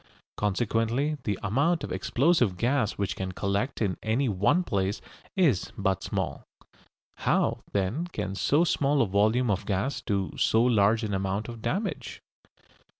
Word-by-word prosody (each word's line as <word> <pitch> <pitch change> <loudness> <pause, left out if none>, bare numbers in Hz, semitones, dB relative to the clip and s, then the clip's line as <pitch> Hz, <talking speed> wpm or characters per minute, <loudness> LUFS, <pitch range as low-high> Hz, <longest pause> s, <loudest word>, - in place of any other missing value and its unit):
Consequently 115 +7 0
the 100 -3 0
amount 145 - +1
of - - -5
explosive 125 - +2
gas 120 +1 +1
which 100 -1 -2
can 95 -1 -4
collect 100 +7 -1
in 95 -3 -1
any 115 +5 +1
one 105 - +2
place 100 - -1 0.4
is 160 - +2
but 95 -2 0
small. - - -3 0.7
How, - - +1
then, 105 - -1
can 100 - -4
so 145 +10 +2
small 145 -4 +2
a - - -1
volume 110 +5 +2
of 100 +1 -2
gas 100 +8 -1
do 100 -2 -1
so 110 +1 +3
large 110 -1 +3
an 105 -2 -2
amount 95 +3 -2
of 115 -1 -8
damage? 150 - -3
110 Hz, 150 wpm, -27 LUFS, 100-135 Hz, 0.7 s, so